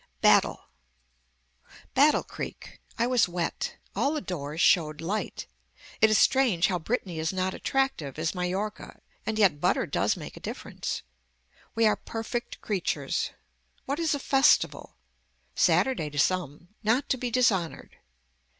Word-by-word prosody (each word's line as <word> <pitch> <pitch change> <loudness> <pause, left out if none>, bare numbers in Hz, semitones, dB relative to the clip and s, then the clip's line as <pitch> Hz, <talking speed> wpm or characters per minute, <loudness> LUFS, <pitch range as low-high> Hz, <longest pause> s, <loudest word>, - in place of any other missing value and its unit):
BATTLE - - +4 1.3
Battle 290 +3 +4
creek. - - -8 0.2
I 235 - +2
was 245 -6 +3
wet. 175 -1 -3 0.2
All 280 - +1
the - - 0
doors 155 - -5
showed 155 -4 +3
light. 195 +6 -3 0.6
It 220 - +7
is 215 - +4
strange 240 -11 +3
how 180 -2 0
Brittany 180 -2 -3
is 160 +1 0
not 185 0 -1
attractive 270 - -1
as 160 +1 -1
Mallorca 190 +4 -4 0.3
and 220 - -1
yet 190 -9 +3
butter - - +2
does - - 0
make - - -8
a - - -10
difference. - - -5 0.7
We 225 0 +3
are 215 - +4
perfect 230 +1 -5
creatures. 195 -5 -1 0.6
What 280 +4 -2
is 325 -3 +1
a - - -4
festival. 270 +1 +2 0.6
Saturday 235 - +2
to 145 - -9
some. 175 0 0
Not 240 +6 +2
to 260 - +1
be 245 0 -3
dishonored. 220 -9 0
210 Hz, 140 wpm, -27 LUFS, 170-250 Hz, 1.3 s, It